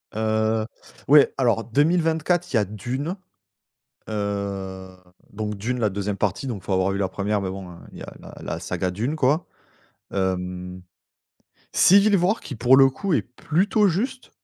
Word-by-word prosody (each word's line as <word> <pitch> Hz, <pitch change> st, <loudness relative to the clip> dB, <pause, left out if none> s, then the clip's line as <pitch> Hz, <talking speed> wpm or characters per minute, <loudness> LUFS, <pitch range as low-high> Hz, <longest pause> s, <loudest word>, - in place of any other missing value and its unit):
Heu, 110 Hz, 0 st, +1 dB, 0.4 s
ouais, 145 Hz, 0 st, +6 dB
alors 115 Hz, -4 st, +2 dB
2024, 160 Hz, +5 st, +1 dB
il -, -, +1 dB
y -, -, +5 dB
a 105 Hz, -, +1 dB
Dune. 125 Hz, -, -4 dB, 0.9 s
Heu, 100 Hz, -3 st, -4 dB, 0.4 s
donc 105 Hz, 0 st, -4 dB
Dune, 120 Hz, +6 st, -3 dB
la 110 Hz, -3 st, +2 dB
2e 100 Hz, +1 st, -3 dB
partie, 100 Hz, +5 st, -1 dB
donc 110 Hz, -7 st, -4 dB
faut 95 Hz, -, -4 dB
avoir 95 Hz, +1 st, +2 dB
vu 100 Hz, -, -2 dB
la 95 Hz, -1 st, 0 dB
1re, 100 Hz, +2 st, -1 dB
mais 95 Hz, -, -3 dB
bon, 95 Hz, -1 st, -7 dB
heu, -, -, -12 dB, 0.2 s
il -, -, -11 dB
y -, -, -7 dB
a -, -, -9 dB
la -, -, -12 dB
la -, -, -4 dB
saga 90 Hz, -, -2 dB
Dune, 115 Hz, -, -2 dB
quoi. 150 Hz, +3 st, +1 dB, 0.7 s
Hem, 90 Hz, -1 st, -3 dB, 0.9 s
Civil 200 Hz, +2 st, +5 dB
War 190 Hz, +5 st, +1 dB
qui 135 Hz, -, -7 dB
pour 125 Hz, +3 st, +5 dB
le 135 Hz, 0 st, +7 dB
coup 185 Hz, +8 st, -3 dB
est -, -, +2 dB
plutôt 185 Hz, -, +1 dB
juste 240 Hz, +9 st, -3 dB
110 Hz, 170 wpm, -23 LUFS, 100-150 Hz, 0.9 s, le